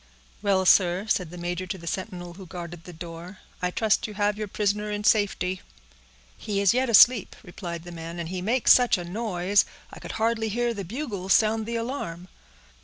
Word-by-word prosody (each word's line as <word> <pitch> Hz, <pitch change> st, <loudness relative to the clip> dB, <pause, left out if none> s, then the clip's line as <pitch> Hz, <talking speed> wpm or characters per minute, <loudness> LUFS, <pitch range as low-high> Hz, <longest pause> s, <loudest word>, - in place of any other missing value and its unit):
"Well, 195 Hz, -2 st, +2 dB
sir," 180 Hz, +1 st, +4 dB
said 180 Hz, -6 st, 0 dB
the 180 Hz, -, -10 dB
major 175 Hz, +1 st, -4 dB
to 190 Hz, -, -4 dB
the 170 Hz, -, -12 dB
sentinel 175 Hz, 0 st, -5 dB
who 185 Hz, +1 st, -11 dB
guarded 175 Hz, -1 st, -8 dB
the 180 Hz, -, -9 dB
door, 170 Hz, +3 st, -9 dB, 0.2 s
"I 180 Hz, -, +1 dB
trust 215 Hz, +4 st, +1 dB
you 210 Hz, -, -9 dB
have 205 Hz, 0 st, +1 dB
your 215 Hz, 0 st, -4 dB
prisoner 210 Hz, +1 st, -1 dB
in 210 Hz, 0 st, -3 dB
safety." 190 Hz, -3 st, +1 dB, 0.8 s
"He 205 Hz, -2 st, -3 dB
is 200 Hz, 0 st, +4 dB
yet 255 Hz, 0 st, +1 dB
asleep," 230 Hz, -1 st, +6 dB
replied 175 Hz, -2 st, -7 dB
the 175 Hz, -, -9 dB
man, 165 Hz, 0 st, -7 dB
"and 170 Hz, -1 st, -4 dB
he 185 Hz, 0 st, -4 dB
makes 235 Hz, +6 st, +5 dB
such 245 Hz, -4 st, +4 dB
a 175 Hz, -, -5 dB
noise, 195 Hz, 0 st, +1 dB, 0.3 s
I -, -, -9 dB
could -, -, -7 dB
hardly 220 Hz, 0 st, 0 dB
hear 240 Hz, +2 st, 0 dB
the 200 Hz, -3 st, -5 dB
bugles 200 Hz, -, -2 dB
sound 220 Hz, 0 st, +2 dB
the 235 Hz, -, -3 dB
alarm." 230 Hz, -8 st, -4 dB
195 Hz, 195 wpm, -26 LUFS, 175-215 Hz, 0.8 s, asleep